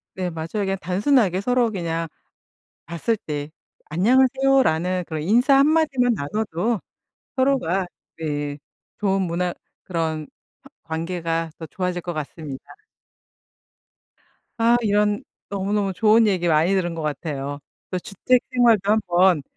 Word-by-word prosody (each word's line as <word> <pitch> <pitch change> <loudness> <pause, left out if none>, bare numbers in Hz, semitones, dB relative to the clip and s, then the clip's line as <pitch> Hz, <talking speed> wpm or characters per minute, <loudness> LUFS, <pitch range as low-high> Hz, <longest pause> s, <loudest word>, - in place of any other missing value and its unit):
네, 185 -1 -2
맞아요. 160 -1 -5 0.2
그냥 195 0 -1
단순하게 195 0 +2
서로 245 0 +2
그냥 165 -3 -2 0.8
봤을 170 +8 -1
때 150 -4 -5 0.4
"안녕하세요."라는 240 - +3
그런 155 -2 -4
인사 245 - +4
1 275 +2 +5
마디만 275 -6 +2
나눠도 210 +5 -1 0.6
서로가 260 -9 +1 0.3
네 145 -2 -3 0.4
좋은 195 -2 +1
문화 175 0 -1 0.3
그런 160 -3 -2 0.4
허 - - -16
관계가 165 0 -3
더 160 - -7
좋아질 180 0 -3
것 175 0 -4
같습니다. 150 -2 -6 2.0
아 230 +1 +5
이런 210 -1 +1 0.3
너무너무 200 0 -1
좋은 220 +3 +4
얘기 180 -3 +1
많이 165 +3 +3
들은 175 -3 0
것 160 - -4
같아요. 145 -1 -4 0.3
또 185 - -1
주택 240 +7 +1
생활도 230 -5 +4
한번 180 -6 +3
185 Hz, 260 characters per minute, -23 LUFS, 165-220 Hz, 2.0 s, 1